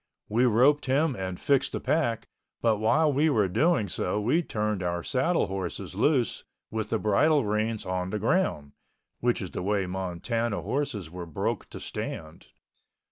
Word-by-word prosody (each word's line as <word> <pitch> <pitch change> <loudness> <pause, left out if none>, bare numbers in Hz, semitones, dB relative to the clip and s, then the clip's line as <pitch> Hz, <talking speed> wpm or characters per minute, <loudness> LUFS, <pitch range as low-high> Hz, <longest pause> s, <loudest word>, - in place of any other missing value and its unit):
We 120 +4 +3
roped 130 +6 +4
him 140 +2 +2
and 95 -2 -4
fixed 140 -2 +2
the - - -1
pack, 120 -8 0 0.3
but 115 -2 +2
while 145 +8 +3
we 150 +4 +3
were 110 -9 +3
doing 130 - +2
so 90 +2 -1
we 130 +11 +2
turned 105 - -2
our 85 -1 -2
saddle 165 +7 +1
horses 95 -1 -5
loose 135 -6 +1 0.3
with 110 -1 -3
the 115 - +1
bridle 135 +7 +3
reins 110 +1 -1
on 90 0 -2
the 105 - -2
ground 105 - 0 0.5
(which 120 -2 +1
is 90 - -6
the - - -4
way 100 +1 0
Montana 95 +5 -2
horses 130 - -2
were 90 -1 -7
broke 80 - -3
to - - -8
stand). - - -6
110 Hz, 165 wpm, -27 LUFS, 95-135 Hz, 0.5 s, roped